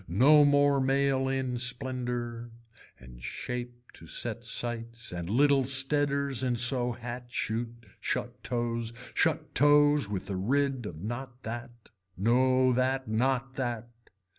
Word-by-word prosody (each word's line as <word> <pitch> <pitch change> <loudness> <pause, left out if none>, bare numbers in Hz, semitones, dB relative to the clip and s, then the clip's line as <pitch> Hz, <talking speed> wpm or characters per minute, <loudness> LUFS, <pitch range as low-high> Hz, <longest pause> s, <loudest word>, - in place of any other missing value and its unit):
No 140 - +6
more 145 -1 +4
mail 135 0 +1
in 130 -2 -2
splendor 125 -2 -2 0.5
and - - -14
shape 120 - -6
to 80 - -14
set 115 +6 -3
sights 115 0 -3
and 85 -1 -5
little 140 +4 +4
steaders 140 0 +2
in 125 -2 +1
so 120 +1 +2
hat 120 +1 -7
shoot, 115 0 -4
shut - - -3
toes, 120 -1 -2 0.2
shut - - 0
toes 145 -3 +4
with 100 -3 -4
a - - -2
rid 130 +4 0
of 80 -2 -9
not 120 +3 -6
that, 120 +2 -5 0.5
no 130 +5 +3
that, 130 +1 0
not 130 +4 0
that. 120 -3 -3
125 Hz, 130 wpm, -29 LUFS, 115-135 Hz, 0.5 s, No